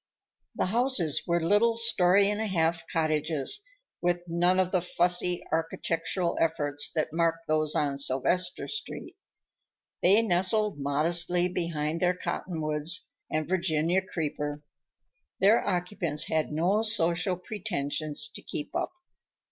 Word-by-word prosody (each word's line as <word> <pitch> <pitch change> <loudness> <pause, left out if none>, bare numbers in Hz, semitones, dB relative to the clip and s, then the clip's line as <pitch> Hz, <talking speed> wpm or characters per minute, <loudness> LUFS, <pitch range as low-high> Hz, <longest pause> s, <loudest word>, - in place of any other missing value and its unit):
The - - 0
houses 220 - +1
were 170 0 +2
little 210 +7 +2
story 200 -4 +4
and 210 +1 -1
a 220 - -1
half 165 -3 0
cottages, 155 - 0 0.4
with 175 0 0
none 175 +2 +2
of 185 -1 +1
the 185 - +1
fussy 175 0 +2
architectural 165 +2 -1
efforts 145 -3 +1
that 155 -1 -1
marked 165 0 0
those 155 -1 +1
on 140 -2 0
Sylvester 140 +7 0
Street. 435 - -7 0.9
They 200 +6 +5
nestled 195 -1 +1
modestly 170 +5 +2
behind 165 -3 -3
their 180 0 +1
cottonwoods 160 -2 -2 0.2
and 155 -1 -2
Virginia 175 -1 +1
creeper; 150 -4 -4 0.8
their 205 +4 +4
occupants 175 -4 -1
had 155 -1 0
no 175 +8 +1
social 180 -4 +1
pretensions 155 -6 -2
to - - -7
keep 145 - -6
up. - - -1
170 Hz, 125 wpm, -28 LUFS, 155-185 Hz, 0.9 s, They